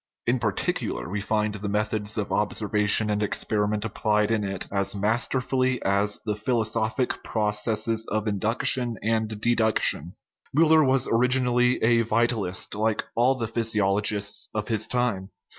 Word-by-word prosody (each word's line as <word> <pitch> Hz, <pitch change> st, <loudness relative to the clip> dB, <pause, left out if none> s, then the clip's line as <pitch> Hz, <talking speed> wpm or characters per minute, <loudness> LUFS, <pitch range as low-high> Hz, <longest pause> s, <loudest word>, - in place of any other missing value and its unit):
In 125 Hz, +1 st, +1 dB
particular, -, -, -2 dB
we 100 Hz, +3 st, -3 dB
find 105 Hz, +1 st, -1 dB
the 105 Hz, 0 st, -5 dB
methods 105 Hz, +1 st, -1 dB
of 105 Hz, -2 st, -3 dB
observation 105 Hz, 0 st, +1 dB
and 105 Hz, 0 st, -1 dB
ex 105 Hz, -, 0 dB
periment 105 Hz, 0 st, -1 dB
applied 105 Hz, 0 st, 0 dB
in 110 Hz, -2 st, +1 dB
it 95 Hz, -2 st, -4 dB
as 100 Hz, 0 st, -1 dB
masterfully 125 Hz, +4 st, 0 dB
as 100 Hz, +1 st, +1 dB
the 105 Hz, -1 st, -1 dB
philosophic 110 Hz, +1 st, -1 dB
processes 110 Hz, +1 st, -1 dB
of 110 Hz, +1 st, -2 dB
induction 115 Hz, +3 st, 0 dB
and 110 Hz, -1 st, -1 dB
deduction. 110 Hz, -7 st, +1 dB, 0.4 s
Miiller 160 Hz, -1 st, +5 dB
was 130 Hz, -1 st, +2 dB
orig 125 Hz, +2 st, +2 dB
inally 125 Hz, -1 st, +2 dB
a 115 Hz, +1 st, +4 dB
vitalist, 110 Hz, -4 st, -1 dB
like 110 Hz, +1 st, -1 dB
all 125 Hz, +3 st, +3 dB
the 115 Hz, -3 st, -3 dB
physiologists 105 Hz, -2 st, 0 dB
of 105 Hz, +1 st, -3 dB
his 110 Hz, -2 st, +1 dB
time. 115 Hz, -6 st, -1 dB
110 Hz, 140 wpm, -25 LUFS, 105-120 Hz, 0.4 s, Miiller